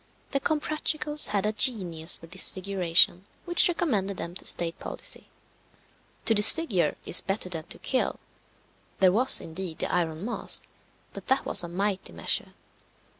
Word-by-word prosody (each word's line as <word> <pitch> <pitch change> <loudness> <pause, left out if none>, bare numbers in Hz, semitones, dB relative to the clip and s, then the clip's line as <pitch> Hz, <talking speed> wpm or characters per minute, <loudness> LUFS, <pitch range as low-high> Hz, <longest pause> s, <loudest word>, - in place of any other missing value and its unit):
The 275 - 0
Comprachicos 305 0 -2
had 205 -1 -1
a 210 - +1
genius 185 -8 +1
for - - -14
disfiguration 185 0 +2 0.2
which 345 0 +4
recommended 215 - -1
them 170 - -6
to 185 - -8
state 170 -1 0
policy. - - -6 1.0
To 225 - +4
disfigure 210 - +5
is - - +4
better 195 -1 -3
than 165 -3 -4
to - - -6
kill. 260 - -2 0.8
There 185 -1 +5
was, 245 +7 +4
indeed, 165 0 -7
the - - -3
Iron 165 0 -2
Mask, 240 - -2 0.5
but - - -10
that 265 0 +1
was - - +5
a - - -5
mighty 190 - -3
measure. 80 -1 -2
195 Hz, 145 wpm, -26 LUFS, 175-245 Hz, 1.0 s, disfigure